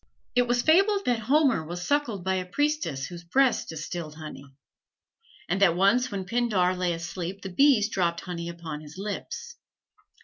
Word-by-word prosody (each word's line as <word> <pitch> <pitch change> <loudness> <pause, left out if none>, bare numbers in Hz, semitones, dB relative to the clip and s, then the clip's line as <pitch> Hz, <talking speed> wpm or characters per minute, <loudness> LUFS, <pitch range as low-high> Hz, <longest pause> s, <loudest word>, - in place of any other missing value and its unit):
It 245 -1 +3
was 245 0 +1
fabled 395 +5 +4
that 240 -2 +1
Homer 260 - +3
was 175 +2 -6
suckled 255 -10 0
by 190 +1 0
a 185 -1 -1
priestess 290 - -1
whose 175 +2 -9
breasts 255 +8 +2
distilled 160 0 -6
honey; 155 -3 -9 1.0
and 195 - -1
that 175 -4 +5
once 235 +7 +3
when 195 -4 -4
Pindar 190 -4 +1
lay 180 -1 0
asleep 170 +3 -5
the 190 - -4
bees 265 -4 +5
dropped 175 -5 0
honey 170 -2 -5
upon 165 -3 -7
his 155 +2 -12
lips. 210 - -6
190 Hz, 165 wpm, -27 LUFS, 170-245 Hz, 1.0 s, that